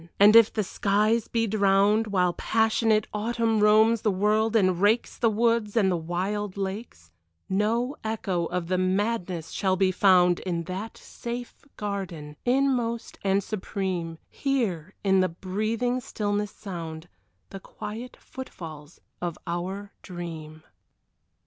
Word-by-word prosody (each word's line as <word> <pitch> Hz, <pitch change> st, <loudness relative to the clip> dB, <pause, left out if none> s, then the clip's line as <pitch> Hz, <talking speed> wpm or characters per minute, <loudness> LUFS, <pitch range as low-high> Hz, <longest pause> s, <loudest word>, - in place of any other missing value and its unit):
And 205 Hz, +2 st, +7 dB
if 230 Hz, -1 st, +8 dB
the 215 Hz, -, -1 dB
skies 210 Hz, +4 st, +1 dB
be 230 Hz, -1 st, 0 dB
drowned 205 Hz, +1 st, +3 dB
While 180 Hz, -3 st, +2 dB
passionate 220 Hz, +1 st, +2 dB
Autumn 225 Hz, +1 st, 0 dB
roams 215 Hz, +2 st, +5 dB
the 215 Hz, -, +2 dB
world 210 Hz, +3 st, +1 dB
and 185 Hz, -4 st, +3 dB
rakes 215 Hz, +4 st, +2 dB
The 230 Hz, -, +2 dB
woods 230 Hz, 0 st, +1 dB
and 195 Hz, -4 st, +4 dB
the -, -, +1 dB
wild 185 Hz, +4 st, -3 dB
lakes, 190 Hz, -, -5 dB, 0.4 s
No 230 Hz, +7 st, 0 dB
echo 195 Hz, -6 st, -1 dB
of 180 Hz, -1 st, -2 dB
the 185 Hz, +1 st, 0 dB
madness 185 Hz, -3 st, -1 dB
shall 190 Hz, -2 st, +1 dB
be 190 Hz, 0 st, +2 dB
found 180 Hz, -2 st, +4 dB
In 170 Hz, -3 st, -3 dB
that 190 Hz, +6 st, -6 dB
safe 240 Hz, 0 st, -7 dB
garden, 180 Hz, -8 st, -5 dB
inmost 245 Hz, -3 st, 0 dB
and 195 Hz, 0 st, +2 dB
supreme, 185 Hz, -5 st, -3 dB
here 205 Hz, -, -2 dB
in 190 Hz, -1 st, +4 dB
the 185 Hz, 0 st, +2 dB
breathing 215 Hz, +8 st, -1 dB
stillness 205 Hz, -2 st, -2 dB
sound 165 Hz, -6 st, -7 dB, 0.4 s
The 195 Hz, -, -7 dB
quiet 220 Hz, +5 st, -8 dB
footfalls 160 Hz, -, -10 dB, 0.2 s
of 175 Hz, -2 st, -3 dB
our 190 Hz, +4 st, -4 dB
Dream. 160 Hz, -4 st, -8 dB
200 Hz, 130 wpm, -26 LUFS, 180-220 Hz, 0.4 s, if